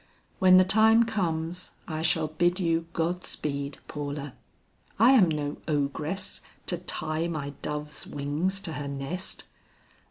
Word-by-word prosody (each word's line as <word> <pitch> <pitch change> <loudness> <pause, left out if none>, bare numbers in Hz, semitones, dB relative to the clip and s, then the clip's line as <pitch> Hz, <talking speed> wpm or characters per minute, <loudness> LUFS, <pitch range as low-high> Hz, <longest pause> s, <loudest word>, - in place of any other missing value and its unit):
"When 185 -1 +7
the 185 - +8
time 220 +4 +6
comes, 180 -5 -2
I 155 -2 -3
shall 160 -1 +2
bid 175 +4 +1
you 165 -2 +1
God 175 +2 -1
speed, 140 -1 -3
Paula. 145 -2 -5 0.6
I 230 +5 +7
am 215 -10 +6
no 150 -2 -2
ogress 155 +6 -2 0.2
to 175 - -1
tie 160 -2 -2
my 150 -4 -3
dove's 150 0 -4
wings 150 +7 -1
to 165 - -5
her 145 -1 -4
nest. 140 +7 -4
165 Hz, 135 wpm, -28 LUFS, 150-185 Hz, 0.6 s, the